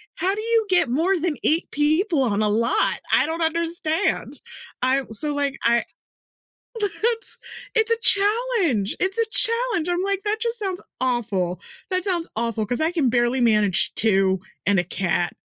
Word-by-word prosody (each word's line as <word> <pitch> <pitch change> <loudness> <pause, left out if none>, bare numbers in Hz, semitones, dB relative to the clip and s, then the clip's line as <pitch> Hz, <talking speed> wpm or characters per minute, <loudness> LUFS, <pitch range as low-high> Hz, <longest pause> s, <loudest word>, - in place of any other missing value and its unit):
how 370 +4 0
do 425 - -4
you 455 0 +1
get 360 -8 +2
more 335 +9 +1
than 320 -2 -2
8 320 +2 +1
people 310 +1 +1
on 215 -4 0
a 210 - +1
lot? 225 +3 +1
I - - +4
don't 325 +1 -4
understand." 330 +2 -1 0.5
I 260 +2 +1
so 290 +7 +2
like 285 -1 -1
I 235 0 +2 1.0
It's 450 +3 -1 0.4
it's 445 0 +2
a 460 - +3
challenge, 405 - +2
it's 380 +4 0
a 460 - +2
challenge, 460 -8 +2
I'm 355 +1 -1
like, 395 0 -1
"That 425 +1 -1
just 465 0 +2
sounds 380 -3 -2 0.2
awful." 200 -9 -1 0.3
That 370 -1 -1
sounds 350 -4 0
awful, 230 -1 -1
'cause 245 +7 -1
I 320 +2 +1
can 320 -7 0
barely 240 +2 +1
manage 210 -5 +2
2 190 -3 +2 0.2
and 200 0 +2
a - - 0
cat, 175 -1 -2
320 Hz, 165 wpm, -22 LUFS, -, 1.0 s, I